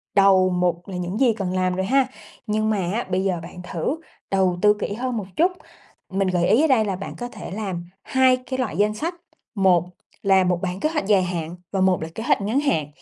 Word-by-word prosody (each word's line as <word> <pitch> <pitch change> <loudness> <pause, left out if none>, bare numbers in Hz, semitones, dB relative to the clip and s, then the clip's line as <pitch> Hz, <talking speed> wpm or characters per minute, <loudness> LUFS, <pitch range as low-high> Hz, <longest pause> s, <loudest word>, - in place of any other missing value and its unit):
đầu 195 -2 +5
mục 180 -1 0
là 190 - -6
những 180 +3 -3
gì 245 -4 +4
cần 190 -4 -3
làm 185 -1 +1
rồi 190 +1 -1
ha. 265 +3 +3 0.4
Nhưng 215 +1 +1
mà 215 - +1 0.2
á 235 - 0
bây 185 +1 0
giờ 185 -3 0
bạn 175 +1 -9
thử 180 - -2 0.3
đầu 190 -2 +2
tư 210 0 +6
kỹ 205 - -2
hơn 245 +1 -2
một 205 - -3
chút, 360 +3 +3 0.6
mình 195 0 0
gợi 180 -1 +1
ý 230 +9 +5
ở 320 - +4
đây 235 -6 +3
là 195 - -1
bạn 195 +2 -6
có 245 - -4
thể 245 - -9
làm 190 -4 -4 0.2
2 260 -1 +4
cái 260 +1 -5
loại 225 -10 -2
danh 210 +1 +2
sách, 325 +11 -3 0.4
một 185 -4 +4 0.4
là 190 -2 +5
một 180 -1 +1
bản 185 0 -3
kế 310 - +1
hoạch 310 -10 -2
dài 200 -3 +4
hạn 170 -2 -3 0.2
và 195 - 0
một 185 -3 +3
là 160 - -3
kế 220 - -4
hoạch 230 - +2
ngắn 215 +7 +1
hạn. 165 - +1
195 Hz, 240 wpm, -23 LUFS, 180-225 Hz, 0.6 s, tư